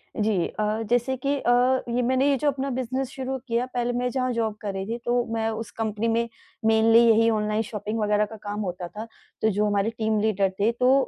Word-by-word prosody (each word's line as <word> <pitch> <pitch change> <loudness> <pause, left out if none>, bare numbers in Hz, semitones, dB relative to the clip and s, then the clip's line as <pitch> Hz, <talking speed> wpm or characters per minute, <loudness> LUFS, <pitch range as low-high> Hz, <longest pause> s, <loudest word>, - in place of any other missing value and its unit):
जी। 210 -5 +1
अ, 215 +1 -2
जैसे 245 +2 +1
कि 275 +3 0
अ, 240 - +1 0.4
ये 250 - +2
मैंने 260 +3 +2
ये 280 - +3
जो 300 - -1
अपना 275 -1 0
बिज़नेस 260 +1 -2
शुरू 265 0 -4
किया 235 +1 0
पहले 245 0 0
मैं 250 +1 0
जहाँ 255 0 -1
जॉब 225 -2 -1
कर 200 -2 -3
रही 190 0 -4
थी, 230 - -2
तो 240 0 0
मैं 225 0 0
उस 220 -1 -5
कंपनी 220 0 -2
में 230 +1 +1 0.4
मेनली 225 +1 +5
यही 225 0 +5
ऑनलाइन 215 0 0
शॉपिंग 215 +1 -4
वग़ैरह 210 0 +2
का 220 - -10
काम 205 0 -4
होता 180 -2 -4
था। 215 +5 -7 0.4
तो 220 - +3
जो 210 +1 +1
हमारे 205 0 +1
टीम 220 -1 +1
लीडर 200 -3 +2
थे 210 +3 +3
तो 250 +2 +3
225 Hz, 220 wpm, -25 LUFS, 210-245 Hz, 0.4 s, मेनली